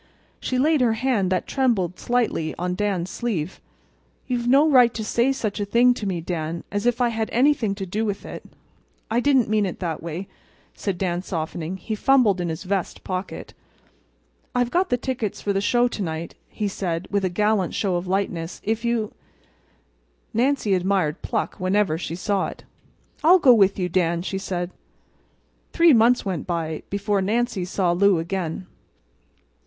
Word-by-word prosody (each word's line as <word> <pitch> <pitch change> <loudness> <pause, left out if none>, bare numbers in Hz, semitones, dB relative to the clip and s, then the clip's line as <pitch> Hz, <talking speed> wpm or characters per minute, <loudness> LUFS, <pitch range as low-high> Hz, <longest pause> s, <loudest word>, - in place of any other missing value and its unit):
She 255 - -2
laid 300 +2 +3
her 235 -3 +3
hand 225 -5 0
that 185 - 0
trembled 210 -10 0
slightly 230 -10 0
on 180 +1 -2
Dan's 190 -2 -1
sleeve. 190 -8 -3 0.6
"You've 240 -2 -2
no 275 +5 +5
right 250 -5 +6
to 220 - -3
say 235 +4 +2
such 220 -6 -3
a - - 0
thing 240 +4 +4
to 215 -4 -5
me, 180 -3 -2
Dan—as 170 +6 -3
if 245 +1 +1
I 240 - +3
had 225 -1 -2
anything 245 -5 +2
to 195 -1 -5
do 210 +5 -2
with 205 -2 -3
it!" - - -8 0.7
"I 230 - +3
didn't 265 -2 +3
mean 215 0 +2
it 180 - -5
that 165 -4 -3
way," 170 +3 -5 0.5
said 195 -3 -3
Dan, 175 -1 -1
softening. 165 0 -4
He 215 +4 -5
fumbled 215 -5 +3
in 175 - -2
his 160 +2 -4
vest 190 -1 -2
pocket. 185 0 -5 1.0
"I've 245 -1 +1
got 365 +2 +1
the 245 - +2
tickets 245 -5 -3
for 200 - -1
the 195 - 0
show 240 +4 +3
to 220 - -5
night," 160 -2 -4 0.2
he 210 - -3
said, 175 -3 -3
with 200 -1 +1
a 185 - +1
gallant 210 0 +1
show 195 -4 0
of 175 +1 -3
lightness. 180 -3 -2
"If 225 +2 -1
you—" 235 -3 -1 1.2
Nancy 245 -3 +1
admired 185 -4 0
pluck - - -3
whenever 185 -3 +1
she 165 - -4
saw 195 +2 0
it. - - -10 0.6
"I'll 350 +4 +7
go 265 -8 +6
with 200 -4 +4
you, 180 -2 0
Dan," 170 -1 0
she 190 +1 -3
said. 175 -2 -3 1.0
Three 335 -2 +6
months 235 +1 +4
went 185 -6 -3
by 165 -3 -2
before 200 0 0
Nancy 215 -1 0
saw 180 -1 0
Lou 195 +1 +4
again. 170 +1 -3
200 Hz, 175 wpm, -23 LUFS, 180-235 Hz, 1.2 s, I'll